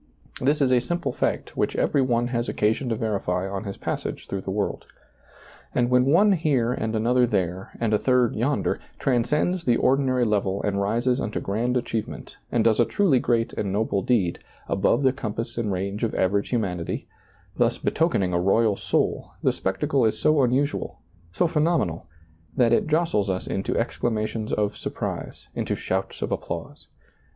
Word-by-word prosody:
This 145 +4 +2
is 130 -2 +3
a 125 - +5
simple 170 +7 -2
fact - - -2
which - - 0
every 140 - +2
one 120 -2 +1
has 120 -1 -1
occasion 110 +5 0
to 115 - 0
verify 95 -4 -1
on 95 +2 -4
his 100 - -5
passage - - -4
through 100 - -3
the 95 - -7
world. 100 +1 -2 0.9
And 120 0 +2
when 125 0 +5
one 195 +9 +5
here 140 -9 +2
and 110 -2 -2
another 120 +3 +3
there, 95 -3 -1
and 115 -2 0
a 105 - +3
third 125 -3 +2
yonder, 130 +6 0 0.2
transcends 150 +8 +1
the 120 -5 +3
ordinary 130 -2 +2
level 100 -3 0
and 100 -1 0
rises 120 +6 +1
unto 110 - -2
grand 120 +5 -1
achieve 115 -3 -2
ment, - - -10
and 120 -2 +2
does 115 0 +3
a 120 - +5
truly 170 - +2
great 115 -1 0
and 100 - -2
noble 100 -1 0
deed, 95 -7 +1 0.3
above - - +2
the 130 -1 +4
compass 115 -3 -4
and 115 -3 -1
range 100 +3 -3
of 115 - 0
average 100 +2 +1
humanity, 90 -8 -2 0.5
thus - - +2
betokening 100 - +1
a 85 - +2
royal 105 +3 +3
soul, - - -1
the - - +4
spectacle 135 +8 0
is 110 - +2
so 155 -2 +3
unusual, 135 +3 0 0.3
so 95 - +1
phenomenal, 150 - 0 0.5
that 120 -2 +4
it - - +2
jostles 155 - +1
us 95 -1 -2
into 95 - -2
exclamations 110 -2 -2
of 105 -1 0
surprise, - - -5
into - - -2
shouts 95 +1 -3
of - - -3
applause. - - -5
115 Hz, 175 wpm, -25 LUFS, 100-130 Hz, 0.9 s, a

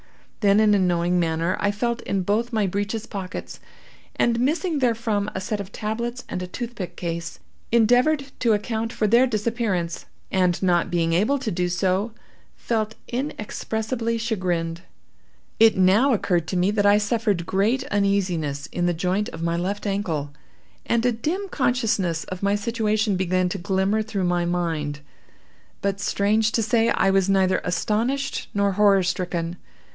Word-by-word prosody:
Then, 205 -1 +4
in 215 -1 +5
a 205 - +4
knowing 175 -1 +2
manner, 165 +1 0
I 205 - +1
felt 235 +3 -1
in 195 -2 -1
both 220 +6 0
my 215 -3 +1
breeches 205 +4 -2
pockets, 195 -4 -6 0.6
and, 235 0 +2
missing 310 +5 0
therefrom 225 -4 0
a - - -1
set 210 +2 -3
of 200 0 -6
tablets 235 +4 -4
and 180 - -4
a 180 - -4
toothpick 225 -2 -6
case, 170 -1 -4 0.3
endeavored 250 +5 +3
to 230 -3 +3
account 220 +2 -2
for 220 - -1
their 235 +5 +5
disappearance, 215 -6 -2 0.2
and 180 -2 +2
not 175 -2 +2
being 165 -1 +1
able 215 +11 +2
to 255 -5 -3
do 180 +1 -1
so, 190 +5 0 0.4
felt 220 -2 -2
inexpressibly 230 -2 -3
chagrined. 180 -7 -2 0.8
It 225 -2 +6
now 195 +9 +4
occurred 175 -6 0
to 185 - -2
me 180 +3 +2
that 205 -1 +2
I 205 0 +6
suffered 210 -4 0
great 215 +9 +1
uneasiness 180 -8 0
in 175 0 0
the 175 - +1
joint 185 +5 0
of 165 - -7
my 170 0 0
left 195 +5 -2
ankle, 170 -8 -2 0.5
and 235 0 +1
a 245 - +4
dim 320 - -2
consciousness 225 - 0
of 185 -1 -7
my 200 0 +2
situation 215 -1 0
began 185 0 +1
to - - -4
glimmer 190 +4 +1
through 215 -3 -3
my 175 -1 +1
mind. 165 -4 -2 0.8
But, 200 0 0
strange 210 +2 +1
to 225 - +2
say! 225 +1 +2
I 195 - +3
was 195 0 +2
neither 190 -1 +3
astonished 225 +10 -1
nor 200 0 +2
horror 200 -1 +4
stricken. 175 -1 -2
200 Hz, 160 wpm, -23 LUFS, 180-225 Hz, 0.8 s, It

